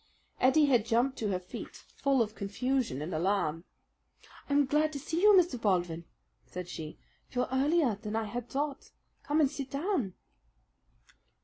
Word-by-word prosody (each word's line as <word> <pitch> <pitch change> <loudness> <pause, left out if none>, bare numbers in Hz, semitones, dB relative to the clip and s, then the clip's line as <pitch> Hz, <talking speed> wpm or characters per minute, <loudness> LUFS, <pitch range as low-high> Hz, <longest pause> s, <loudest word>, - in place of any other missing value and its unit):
Ettie 280 +4 +5
had 250 -6 +4
jumped 245 +3 +2
to 220 - -1
her 195 -2 0
feet 180 0 -8 0.2
full 275 -3 +3
of 215 -1 -7
confusion 220 - -1
and 170 +3 -5
alarm. 170 -1 0 0.8
"I'm 285 0 +4
glad 300 +3 +2
to 285 - -4
see 320 +4 -2
you, 420 +1 +7
Mr. 305 -10 0
Baldwin," 175 -4 0 0.4
said 180 -1 -7
she. 155 -3 -7 0.3
"You're 250 0 -1
earlier 280 0 +3
than 215 0 -4
I 225 - +1
had 240 +3 -5
thought. 280 0 -3 0.3
Come 295 +1 0
and 280 -2 +3
sit 275 -3 -5
down." 280 - -1
250 Hz, 155 wpm, -31 LUFS, 195-285 Hz, 0.8 s, you